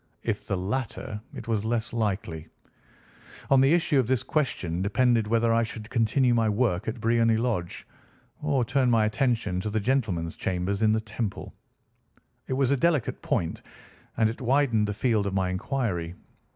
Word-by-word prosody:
If - - -3
the 95 - -1
latter, 110 +2 -3
it 115 - -8
was 110 -3 0
less 115 0 -1
likely. 95 -8 -2 1.0
On 135 -1 +6
the 135 +2 +4
issue 160 -4 +2
of 125 - +1
this 130 -3 +1
question 90 - -1
depended 115 +2 +2
whether 115 +1 +2
I 115 - +3
should 110 0 -6
continue 120 +1 +2
my 115 -2 +2
work 105 -4 0
at 115 +2 -3
Briony 115 0 +3
Lodge, 110 -7 -2 0.6
or 140 -5 +1
turn 125 +2 +2
my 115 -2 +4
attention 110 -5 0
to 105 - -3
the 110 +1 0
gentleman's 100 -9 -1
chambers 95 +2 -2
in 110 -1 +4
the 110 - +1
Temple. 110 -1 -5 0.9
It - - -2
was 135 0 +1
a 140 - +3
delicate 155 -3 +1
point, 80 - -1 0.6
and 110 -1 +4
it 115 +4 -5
widened 125 -4 +2
the 105 - -2
field 110 -3 +1
of 95 - -3
my 95 -1 +1
inquiry. 95 -5 -2
115 Hz, 170 wpm, -26 LUFS, 100-125 Hz, 1.0 s, On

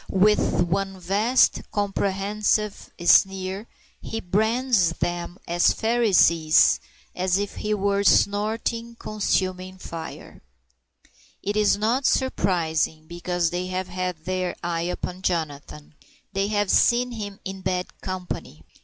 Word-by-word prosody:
With 195 -2 +3
one 195 +2 -2
vast 205 +8 +2
comprehensive 205 +1 -1 0.2
sneer 195 +3 +3 0.3
he 225 - -4
brands 220 -1 +1
them 175 +1 -3
as 175 +1 +3
Pharisees, 190 -9 +4 0.4
as 185 0 +1
if 205 0 -4
he 210 0 -1
were 200 0 0
snorting 220 +4 +1
consuming 185 -4 -2
fire. 165 -3 -9 1.0
It 205 +1 -2
is 210 -1 +3
not 235 +6 +1
surprising, 160 - 0
because 175 0 -2
they 180 +1 -2
have 185 0 -3
had 180 -3 -4
their 185 -1 -2
eye 170 0 -1
upon 180 +1 -5
Jonathan. 150 -4 -3 0.4
They 195 0 0
have 205 -2 0
seen 245 +1 +3
him 205 -3 -6
in 190 0 -6
bad 180 -1 -3
company. 180 - -6
190 Hz, 115 wpm, -24 LUFS, 175-210 Hz, 1.0 s, Pharisees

